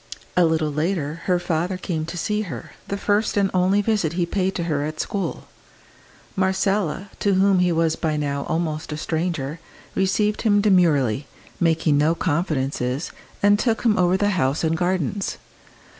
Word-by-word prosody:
A 180 Hz, -, +5 dB
little 160 Hz, -2 st, +1 dB
later 155 Hz, 0 st, -2 dB
her 180 Hz, -1 st, +3 dB
father 175 Hz, +1 st, -1 dB
came 160 Hz, -4 st, -3 dB
to 175 Hz, -, -6 dB
see 210 Hz, +5 st, -1 dB
her, 145 Hz, -, -7 dB, 0.2 s
the 200 Hz, -, -2 dB
first 205 Hz, +2 st, +1 dB
and 195 Hz, -1 st, +2 dB
only 190 Hz, +3 st, +3 dB
visit 200 Hz, -7 st, 0 dB
he 175 Hz, 0 st, 0 dB
paid 190 Hz, +2 st, -1 dB
to 170 Hz, -, -1 dB
her 150 Hz, -4 st, -1 dB
at 155 Hz, +1 st, -5 dB
school. 200 Hz, -2 st, -3 dB, 0.9 s
Marcella, 190 Hz, 0 st, 0 dB
to 200 Hz, -2 st, +2 dB
whom 195 Hz, 0 st, +4 dB
he 180 Hz, -1 st, +3 dB
was 165 Hz, -1 st, +2 dB
by 155 Hz, -2 st, -1 dB
now 140 Hz, -1 st, -2 dB
almost 160 Hz, -1 st, -2 dB
a 150 Hz, -, -3 dB
stranger, 160 Hz, -2 st, -2 dB, 0.3 s
received 210 Hz, +2 st, +1 dB
him 205 Hz, -3 st, +3 dB
demurely, 155 Hz, -, +3 dB, 0.3 s
making 160 Hz, -3 st, +2 dB
no 155 Hz, +3 st, +3 dB
confidences, 145 Hz, -5 st, -1 dB, 0.3 s
and 205 Hz, 0 st, +5 dB
took 225 Hz, -2 st, 0 dB
him 225 Hz, -3 st, +4 dB
over 180 Hz, 0 st, +3 dB
the 205 Hz, +1 st, +1 dB
house 145 Hz, -6 st, 0 dB
and 160 Hz, 0 st, +1 dB
gardens. 185 Hz, +2 st, -1 dB
175 Hz, 165 wpm, -23 LUFS, 155-195 Hz, 0.9 s, A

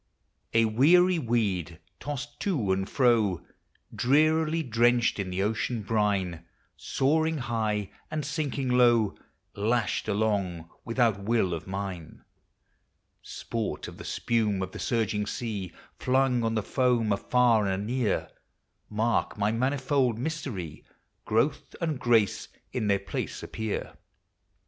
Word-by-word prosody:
A 115 Hz, 0 st, +5 dB
weary 170 Hz, +11 st, +4 dB
weed, 100 Hz, -, -1 dB, 0.2 s
tossed 145 Hz, 0 st, -6 dB
to 135 Hz, -, 0 dB
and 95 Hz, +1 st, -1 dB
fro, 115 Hz, -, +2 dB, 0.5 s
Drearily 155 Hz, +4 st, +2 dB
drenched 120 Hz, -2 st, +2 dB
in 95 Hz, -2 st, -2 dB
the 90 Hz, +1 st, -1 dB
ocean 110 Hz, +2 st, -1 dB
brine, 100 Hz, -6 st, 0 dB, 0.3 s
Soaring 160 Hz, +4 st, +1 dB
high 110 Hz, -6 st, -2 dB, 0.2 s
and 155 Hz, -2 st, -3 dB
sinking 140 Hz, -3 st, -2 dB
low, 120 Hz, -4 st, +4 dB, 0.4 s
Lashed 115 Hz, +3 st, 0 dB
along 100 Hz, -6 st, -1 dB, 0.2 s
without 115 Hz, -4 st, +1 dB
will 100 Hz, -3 st, +1 dB
of 80 Hz, +1 st, -5 dB
mine; 95 Hz, -4 st, -6 dB, 1.0 s
Sport 115 Hz, -3 st, -4 dB
of -, -, -10 dB
the -, -, -7 dB
spume 105 Hz, -5 st, 0 dB
of 95 Hz, -, -5 dB
the -, -, -8 dB
surging 110 Hz, -3 st, 0 dB
sea; 100 Hz, -7 st, -4 dB, 0.3 s
Flung 130 Hz, -2 st, +2 dB
on 115 Hz, 0 st, 0 dB
the 110 Hz, -, 0 dB
foam, 125 Hz, -4 st, +1 dB
afar 115 Hz, +1 st, +3 dB
and 95 Hz, +1 st, -1 dB
anear, 120 Hz, -4 st, 0 dB, 0.6 s
Mark 110 Hz, +1 st, 0 dB
my 105 Hz, +1 st, +1 dB
manifold 130 Hz, 0 st, +1 dB
mystery, 120 Hz, -, -5 dB, 0.2 s
— -, -, -48 dB
Growth 115 Hz, +7 st, 0 dB
and 160 Hz, -6 st, -1 dB
grace 115 Hz, -5 st, +2 dB, 0.3 s
in 105 Hz, -, -1 dB
their 100 Hz, -1 st, +3 dB
place 100 Hz, -, -5 dB
appear. 110 Hz, -1 st, -4 dB
115 Hz, 125 wpm, -28 LUFS, 100-130 Hz, 1.0 s, A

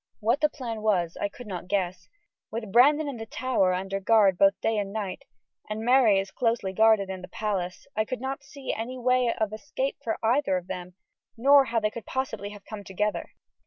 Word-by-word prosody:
What 235 Hz, +6 st, +1 dB
the 300 Hz, -, +4 dB
plan 235 Hz, -7 st, -6 dB
was 180 Hz, -6 st, +1 dB
I 205 Hz, -, 0 dB
could 245 Hz, +4 st, -11 dB
not 180 Hz, -4 st, -6 dB
guess. 185 Hz, -2 st, -2 dB, 0.4 s
With 220 Hz, -2 st, -5 dB
Brandon 290 Hz, +7 st, +5 dB
in 275 Hz, -4 st, -4 dB
the 225 Hz, 0 st, -7 dB
Tower 235 Hz, -7 st, +1 dB
under 195 Hz, +1 st, -3 dB
guard 200 Hz, -2 st, +4 dB
both 195 Hz, +2 st, +4 dB
day 225 Hz, -1 st, 0 dB
and 200 Hz, -1 st, -3 dB
night, 200 Hz, -3 st, -4 dB, 0.4 s
and 215 Hz, +1 st, -3 dB
Mary 245 Hz, -6 st, +5 dB
as 195 Hz, 0 st, -4 dB
closely 225 Hz, -4 st, 0 dB
guarded 220 Hz, -1 st, +4 dB
in 185 Hz, -1 st, -6 dB
the 185 Hz, -, -8 dB
palace, 185 Hz, -3 st, -3 dB
I 215 Hz, -, +1 dB
could 255 Hz, +2 st, -4 dB
not 270 Hz, +2 st, -4 dB
see 280 Hz, -1 st, -6 dB
any 240 Hz, +4 st, -5 dB
way 250 Hz, -1 st, +2 dB
of 215 Hz, -2 st, -2 dB
escape 270 Hz, +3 st, -3 dB
for 225 Hz, -, -1 dB
either 230 Hz, -4 st, +2 dB
of 180 Hz, -, -6 dB
them, 180 Hz, -1 st, -7 dB, 0.4 s
nor 275 Hz, +3 st, +6 dB
how 235 Hz, -2 st, 0 dB
they 215 Hz, -1 st, 0 dB
could 230 Hz, +1 st, -9 dB
possibly 220 Hz, -6 st, -3 dB
have 205 Hz, -1 st, -12 dB
come 215 Hz, -2 st, -8 dB
together. 210 Hz, +2 st, -2 dB
220 Hz, 205 wpm, -27 LUFS, 195-250 Hz, 0.4 s, nor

